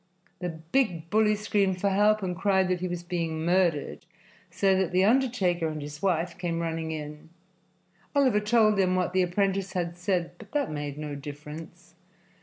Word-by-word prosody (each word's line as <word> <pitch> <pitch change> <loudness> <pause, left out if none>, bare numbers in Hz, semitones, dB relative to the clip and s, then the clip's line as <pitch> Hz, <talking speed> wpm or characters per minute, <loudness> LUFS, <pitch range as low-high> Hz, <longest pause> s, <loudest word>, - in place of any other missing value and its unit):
The 180 0 -3
big 165 +1 -1
bully 215 0 +4
screamed 200 -3 0
for 200 +1 +1
help 210 +1 +3
and 180 -1 -2
cried 190 0 +2
that 180 -1 0
he 185 - -2
was 175 -1 -4
being 165 -2 -2
murdered, 175 -5 +1 0.4
so 195 -1 +2
that 190 -2 0
the 185 +1 +3
undertaker 205 -8 +2
and 155 -1 -4
his 150 +1 -8
wife 175 -2 0
came 170 -2 -2
running 165 -1 -2
in. 150 0 -7 0.9
Oliver 260 -7 +4
told 215 0 +3
them 185 -1 +2
what 180 -1 0
the 185 - +3
apprentice 195 +1 0
had 175 -1 -3
said, 175 -2 0
but - - -14
that 285 - 0
made 145 -1 -4
no 150 -1 -5
difference. 150 +4 -9
180 Hz, 175 wpm, -27 LUFS, 165-195 Hz, 0.9 s, bully